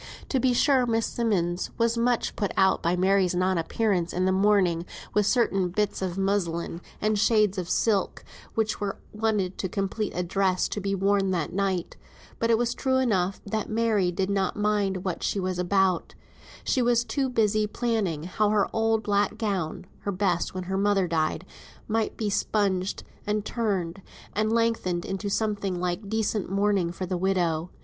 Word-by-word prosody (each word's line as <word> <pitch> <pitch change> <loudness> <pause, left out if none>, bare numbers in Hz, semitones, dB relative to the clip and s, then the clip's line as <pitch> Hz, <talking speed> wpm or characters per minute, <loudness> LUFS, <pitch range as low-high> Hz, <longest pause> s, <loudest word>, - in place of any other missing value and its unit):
To 265 - +1
be 255 0 +3
sure 255 0 +3
Miss 225 -1 +1
Simmonds 185 -7 -1
was 230 0 +2
much 235 0 +1
put 205 - -1
out 190 0 +4
by 170 +1 +1
Mary's 185 0 +2
non 185 0 +1
appearance 180 -1 0
in 180 +1 +1
the 190 - +3
morning 190 -3 +3 0.3
with 210 -1 +2
certain 195 -7 +2
bits 205 +3 -1
of 185 -1 -2
muslin, 175 -4 -1 0.2
and 215 0 +1
shades 210 -3 +3
of 180 -1 -5
silk 205 -4 +1 0.3
which 220 -1 0
were 200 -1 -2 0.2
wanted 210 -4 -1
to 190 - -2
complete 200 +2 -2
a 180 - 0
dress 185 +1 +1
to 205 - -3
be 195 0 -1
worn 195 0 +2
that 170 -5 -1
night; 190 -2 -1 0.4
but 230 - +1
it 230 - +5
was 240 0 0
true 260 0 0
enough 195 -7 +1
that 215 +1 -3
Mary 215 -5 +1
did 190 +2 -1
not 195 -2 0
mind 205 -3 0
what 185 - -2
she 200 - -1
was 185 -1 -2
about; 185 0 +1 0.5
she 260 - +1
was 240 -1 +3
too 270 +1 -1
busy 215 -3 +2
planning 210 -9 -1
how 205 +4 0
her 210 -1 +2
old 225 0 +1
black 205 +1 +1
gown 190 -5 -2
(her 200 - -3
best 185 -2 0
when 185 - -3
her 190 +1 -2
mother 200 -2 +2
died) 160 +1 -1 0.4
might 220 0 -1
be 215 - -1
spunged, 195 -2 0 0.2
and 210 0 0
turned, 195 -7 -2 0.3
and 215 +2 0
lengthened 225 -7 0
into 195 +2 -3
something 200 -3 -1
like 180 +3 -3
decent 220 -2 -1
mourning 195 -3 +1
for 185 +2 -5
the 180 0 -2
widow. 175 -3 0
200 Hz, 175 wpm, -26 LUFS, 185-215 Hz, 0.5 s, it